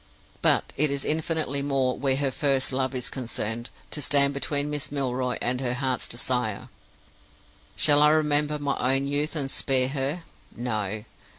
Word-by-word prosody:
But -, -, +2 dB
it 150 Hz, +1 st, +4 dB
is 140 Hz, -1 st, -2 dB
infinitely 155 Hz, -2 st, +1 dB
more, 135 Hz, -2 st, 0 dB
where 135 Hz, -1 st, +1 dB
her 135 Hz, -1 st, 0 dB
first 135 Hz, -1 st, +1 dB
love 130 Hz, 0 st, -1 dB
is 125 Hz, -1 st, -3 dB
concerned, 120 Hz, -2 st, -3 dB, 0.2 s
to 150 Hz, -, -3 dB
stand 140 Hz, 0 st, +4 dB
between 145 Hz, +1 st, -1 dB
Miss 145 Hz, -2 st, -3 dB
Milroy 130 Hz, -3 st, -1 dB
and 125 Hz, +1 st, 0 dB
her 125 Hz, -1 st, -1 dB
heart's 130 Hz, -1 st, -2 dB
desire. 120 Hz, -3 st, -2 dB, 1.1 s
Shall 145 Hz, -1 st, +5 dB
I 150 Hz, -, +7 dB
remember 150 Hz, -1 st, +2 dB
my 140 Hz, -2 st, +1 dB
own 135 Hz, +1 st, +1 dB
youth 145 Hz, +3 st, -1 dB
and 135 Hz, -3 st, -2 dB
spare 130 Hz, -2 st, +1 dB
her? 140 Hz, +5 st, -2 dB, 0.3 s
No! 110 Hz, -3 st, -3 dB
135 Hz, 160 wpm, -26 LUFS, 125-145 Hz, 1.1 s, I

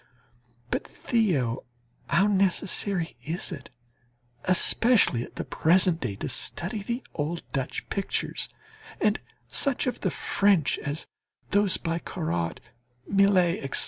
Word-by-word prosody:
But, -, -, 0 dB
Theo, 155 Hz, -, 0 dB, 0.5 s
how 190 Hz, +4 st, +4 dB
necessary 195 Hz, -2 st, +1 dB
it 160 Hz, +3 st, -3 dB
is, 180 Hz, -, -4 dB, 0.9 s
especially 185 Hz, -, +4 dB
at -, -, -12 dB
the -, -, -4 dB
present 175 Hz, 0 st, +4 dB
day, 100 Hz, -, -3 dB
to -, -, -4 dB
study 190 Hz, +5 st, -2 dB
the 235 Hz, +6 st, -3 dB
old 165 Hz, +3 st, -3 dB
Dutch 135 Hz, -3 st, -3 dB
pictures, 195 Hz, -, -2 dB, 0.5 s
and 215 Hz, 0 st, +2 dB, 0.3 s
such 275 Hz, -3 st, +2 dB
of 250 Hz, -, -2 dB
the 190 Hz, -, 0 dB
French 190 Hz, 0 st, +2 dB
as 145 Hz, +2 st, -4 dB, 0.5 s
those 205 Hz, -1 st, +3 dB
by 165 Hz, -1 st, -2 dB
Corot, 85 Hz, -, -3 dB, 0.5 s
Millet, 195 Hz, -3 st, +3 dB
etc. 135 Hz, -, +1 dB
180 Hz, 120 wpm, -27 LUFS, 155-200 Hz, 0.9 s, how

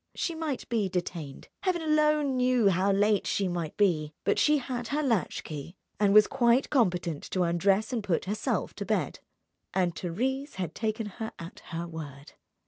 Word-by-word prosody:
She 340 Hz, -, -1 dB
might 320 Hz, -5 st, -3 dB
be 220 Hz, -5 st, 0 dB
detained, 175 Hz, -5 st, -4 dB
Heaven 360 Hz, -3 st, 0 dB
alone 300 Hz, -3 st, +2 dB
knew 250 Hz, -4 st, +3 dB
how 190 Hz, +2 st, +2 dB
late 205 Hz, +1 st, +2 dB
she 195 Hz, -, +1 dB
might 175 Hz, -3 st, -3 dB
be; 155 Hz, -7 st, +1 dB
but -, -, +2 dB
she 300 Hz, 0 st, +4 dB
had 245 Hz, -3 st, -4 dB
her 295 Hz, +4 st, -1 dB
latch 230 Hz, -9 st, 0 dB
key 155 Hz, +3 st, -7 dB, 0.2 s
and 205 Hz, -1 st, +4 dB
was 210 Hz, +1 st, +8 dB
quite 250 Hz, 0 st, +2 dB
competent 180 Hz, -, +1 dB
to 185 Hz, -, +1 dB
undress 195 Hz, +7 st, +2 dB
and 230 Hz, -3 st, -1 dB
put 190 Hz, -4 st, 0 dB
herself 205 Hz, +3 st, -1 dB
to -, -, -4 dB
bed. -, -, -1 dB, 0.6 s
And 180 Hz, -2 st, +2 dB
Thérèse 260 Hz, -, -2 dB
had 180 Hz, -4 st, -3 dB
taken 220 Hz, 0 st, -2 dB
her 220 Hz, +2 st, -6 dB
at 165 Hz, +1 st, -9 dB
her 170 Hz, 0 st, -4 dB
word. 145 Hz, -4 st, -9 dB
205 Hz, 175 wpm, -28 LUFS, 175-255 Hz, 0.6 s, was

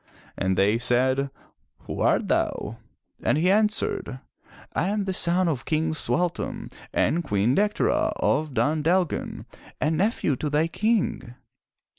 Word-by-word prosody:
'' -, -, -26 dB
And 95 Hz, -1 st, 0 dB
they 105 Hz, +4 st, +3 dB
said, 130 Hz, +3 st, +1 dB, 0.5 s
"Who -, -, -5 dB
art -, -, +2 dB
thou?" -, -, -1 dB, 0.4 s
And -, -, +2 dB
he 180 Hz, +4 st, +3 dB
answered, 210 Hz, -, +1 dB, 0.3 s
" -, -, -22 dB
I -, -, 0 dB
am 205 Hz, 0 st, -1 dB
the 190 Hz, -, -2 dB
son 180 Hz, +1 st, +2 dB
of 140 Hz, -6 st, -1 dB
King 160 Hz, 0 st, 0 dB
Sualtam 175 Hz, +2 st, -2 dB, 0.2 s
and 170 Hz, +2 st, +1 dB
Queen 105 Hz, -3 st, +1 dB
Dectera 210 Hz, +3 st, +1 dB
of 155 Hz, -4 st, 0 dB
Dun 150 Hz, +3 st, +1 dB
Dalgan 175 Hz, +2 st, 0 dB, 0.3 s
and 155 Hz, +1 st, +1 dB
nephew 190 Hz, -, +1 dB
to 150 Hz, -, -2 dB
thy 150 Hz, +2 st, +2 dB
King." 205 Hz, -, -1 dB
155 Hz, 145 wpm, -25 LUFS, 130-185 Hz, 0.5 s, they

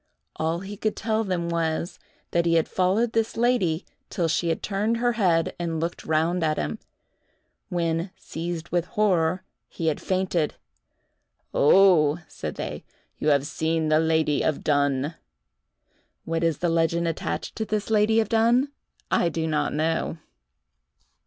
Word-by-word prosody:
All 165 Hz, +2 st, -1 dB
he 200 Hz, +1 st, -7 dB
could 215 Hz, +1 st, -1 dB
tell 220 Hz, 0 st, 0 dB
them 180 Hz, -4 st, -2 dB
was, 170 Hz, +1 st, -2 dB, 0.3 s
that 170 Hz, 0 st, +2 dB
he 165 Hz, -, +3 dB
had 165 Hz, -, +3 dB
followed 195 Hz, +6 st, +1 dB
this 225 Hz, 0 st, 0 dB
lady 225 Hz, -9 st, +1 dB, 0.2 s
till 175 Hz, -5 st, 0 dB
she 170 Hz, +1 st, 0 dB
had 165 Hz, -, -2 dB
turned 210 Hz, +3 st, 0 dB
her 240 Hz, +1 st, +2 dB
head 180 Hz, -8 st, +2 dB
and 165 Hz, -2 st, -2 dB
looked 170 Hz, +2 st, -4 dB
round 165 Hz, +3 st, +1 dB
at 155 Hz, -1 st, +1 dB
him, 75 Hz, 0 st, -3 dB, 0.9 s
when, 170 Hz, 0 st, -1 dB
seized 170 Hz, 0 st, -5 dB
with 175 Hz, 0 st, 0 dB
horror, 185 Hz, -3 st, +1 dB, 0.3 s
he 165 Hz, -, -5 dB
had 150 Hz, -, -3 dB
fainted. 185 Hz, -4 st, 0 dB, 1.0 s
"Oh," 160 Hz, -2 st, +5 dB
said -, -, -6 dB
they, -, -, -5 dB, 0.4 s
"you -, -, -2 dB
have 140 Hz, -2 st, +3 dB
seen 160 Hz, +1 st, -1 dB
the 155 Hz, 0 st, +4 dB
lady 160 Hz, -2 st, +2 dB
of 155 Hz, -, -1 dB
Dunn." 145 Hz, 0 st, +1 dB, 1.1 s
What 165 Hz, 0 st, -1 dB
is 165 Hz, -3 st, +1 dB
the 175 Hz, -, 0 dB
legend 165 Hz, +1 st, +1 dB
attached 165 Hz, -, -3 dB
to 220 Hz, -, -1 dB
this 210 Hz, 0 st, -2 dB
lady 220 Hz, +1 st, +4 dB
of 220 Hz, -, +1 dB
Dunn, 235 Hz, +5 st, +3 dB, 0.4 s
I 170 Hz, -, +3 dB
do 165 Hz, 0 st, -2 dB
not 155 Hz, -1 st, 0 dB
know. 160 Hz, +2 st, -1 dB
170 Hz, 150 wpm, -25 LUFS, 160-195 Hz, 1.1 s, Oh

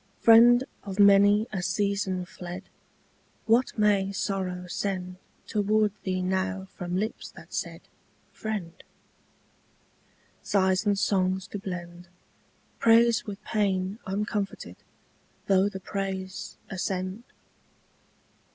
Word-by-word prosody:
Friend 240 Hz, +2 st, +7 dB, 0.2 s
of 195 Hz, 0 st, -7 dB
many 200 Hz, +1 st, +6 dB
a 190 Hz, -, -2 dB
season 200 Hz, -1 st, -1 dB
fled, 180 Hz, +1 st, -8 dB, 0.8 s
What 230 Hz, +3 st, +2 dB
may 205 Hz, -2 st, +3 dB
sorrow 185 Hz, -2 st, -3 dB
send 185 Hz, 0 st, -3 dB, 0.3 s
Toward 210 Hz, 0 st, +1 dB
thee 185 Hz, -1 st, -2 dB
now 190 Hz, +1 st, -1 dB
from 180 Hz, 0 st, -4 dB
lips 215 Hz, +3 st, -3 dB
that -, -, -14 dB
said -, -, -4 dB, 0.5 s
'Friend'? 195 Hz, -6 st, -5 dB, 1.6 s
Sighs 190 Hz, +1 st, +1 dB
and 200 Hz, -1 st, +3 dB
songs 190 Hz, -2 st, +1 dB
to 205 Hz, -, -5 dB
blend 175 Hz, -2 st, -7 dB, 0.7 s
Praise 230 Hz, 0 st, +4 dB
with 200 Hz, -1 st, -7 dB
pain 195 Hz, -1 st, -1 dB
uncomforted 200 Hz, +1 st, -3 dB, 0.7 s
Though 195 Hz, 0 st, +3 dB
the 190 Hz, -, -7 dB
praise 190 Hz, -1 st, -5 dB
ascend? 185 Hz, +2 st, -3 dB
195 Hz, 100 wpm, -27 LUFS, 185-210 Hz, 1.6 s, Friend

